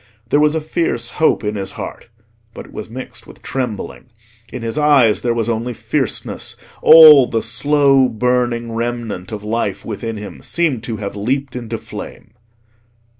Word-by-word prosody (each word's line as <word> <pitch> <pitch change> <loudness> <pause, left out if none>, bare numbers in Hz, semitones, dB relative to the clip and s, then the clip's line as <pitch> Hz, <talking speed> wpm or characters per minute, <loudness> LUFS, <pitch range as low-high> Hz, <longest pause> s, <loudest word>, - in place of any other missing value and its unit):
There 145 - +4
was 150 +1 +3
a 160 - -1
fierce 150 -7 -2
hope 160 -6 +1
in 105 0 -2
his 95 -2 -5
heart, - - -8 0.5
but - - -8
it - - -17
was 105 - -7
mixed 130 +3 -9
with - - -15
trembling. 125 -6 -4 0.5
In 125 - -6
his 115 -1 -3
eyes 145 -8 +4
there 120 - 0
was 115 -1 -1
only 120 +1 -2
fierceness: 115 +3 -3 0.3
all 155 -5 +9
the 115 -1 -1
slow 135 +2 +3
burning 120 0 -1
remnant 115 -5 -4
of 105 -1 -6
life 105 -3 -2
within 115 +1 -5
him 105 0 -9
seemed 155 -9 -1
to 115 -2 -4
have 100 -1 -6
leaped 130 +6 -2
into 115 -2 -5
flame. 110 - -10
120 Hz, 165 wpm, -18 LUFS, 110-135 Hz, 0.5 s, all